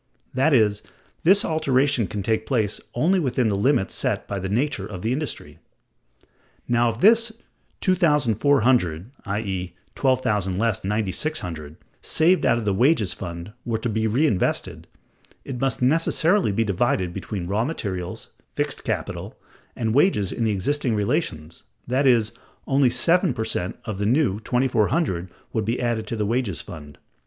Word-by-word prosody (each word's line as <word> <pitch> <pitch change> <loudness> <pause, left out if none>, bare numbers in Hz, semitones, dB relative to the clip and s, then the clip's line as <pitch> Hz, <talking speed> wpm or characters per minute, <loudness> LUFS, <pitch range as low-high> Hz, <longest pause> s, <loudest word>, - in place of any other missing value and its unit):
That 135 +5 +2
is, 105 -6 +3 0.4
this 195 +5 +4
alteration 140 - +1
can 100 +2 -4
take 110 +1 0
place 110 -6 0
only 175 +10 +3
within 125 -6 +1
the 100 - 0
limits 100 0 +1
set - - -1
by 100 - -3
the 95 0 -4
nature 115 -2 -1
of 95 -4 -8
the 115 +3 +1
industry. 150 +2 -5 1.1
Now, 120 0 +3
if 115 +1 -5
this 230 +2 +5 0.5
$2,400 130 - +2 0.2
(i.e., 95 -4 -3 0.2
$12,000 105 -8 +1
less 115 -2 0
$9,600) 95 - -3 0.3
saved 175 +4 +2
out 115 - +3
of 115 - -3
the 100 - +1
wages 115 - +2
fund 85 +2 -7
were 115 -2 -1
to 115 +2 -3
be 110 0 0
reinvested, 120 -2 0 0.6
it 125 -3 -5
must 135 -2 0
necessarily 165 - +3
be 115 +3 +1
divided 95 -3 0
between 95 -2 -5
raw 100 +5 0
materials, 95 - -4 0.2
fixed - - -2
capital, - - -4 0.4
and 110 -2 -1
wages 135 - +3
in 115 - -1
the 110 - +2
existing 120 +5 0
relations, 100 - -2 0.2
that 130 +3 +1
is, 115 -4 +3 0.3
only 135 -1 +3
seven 170 +3 +2
per 110 - -2
cent 90 -5 -2
of 105 -3 -5
the 100 - 0
new 120 -5 +2
$2,400 120 - 0 0.2
would 110 - 0
be 115 +3 -1
added 120 -3 -1
to 115 - -3
the 105 -1 -1
wages 110 - -1
fund. 75 -4 -11
115 Hz, 150 wpm, -23 LUFS, 100-135 Hz, 1.1 s, this